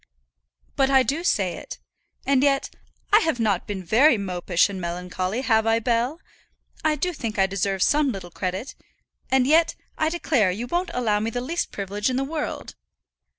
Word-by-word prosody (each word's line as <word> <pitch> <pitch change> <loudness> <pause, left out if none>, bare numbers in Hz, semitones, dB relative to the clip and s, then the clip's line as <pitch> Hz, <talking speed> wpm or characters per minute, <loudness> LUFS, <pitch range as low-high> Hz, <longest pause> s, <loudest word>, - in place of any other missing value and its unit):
"But 270 -1 +2
I 265 -1 +5
do 295 +6 -2
say 195 - +1
it. - - -9 0.5
And 270 -1 +3
yet 275 -1 +1 0.4
I 425 - +9
have 320 - -1
not 205 -5 0
been 195 -2 -4
very 240 - +4
mopish 180 -3 +1
and 195 -2 -6
melancholy; 180 +5 -3
have 225 -4 +2
I, 225 0 +4
Bell? 240 +6 0 0.6
I 310 -1 +2
do 355 +5 -2
think 230 -7 -5
I 195 - +4
deserve 195 0 -1
some 295 -2 +3
little 185 -5 -8
credit, 185 +8 -4 0.6
and 265 -1 +3
yet, 320 +4 +3 0.2
I 315 - +2
declare, 285 - +1
you 205 +7 -3
won't 350 +8 -1
allow 220 -4 +1
me 220 +2 -1
the 245 - -3
least 320 +8 -3
privilege 205 +3 -2
in 255 - -1
the 265 - 0
world." 300 +2 -4
230 Hz, 180 wpm, -24 LUFS, 195-280 Hz, 0.6 s, I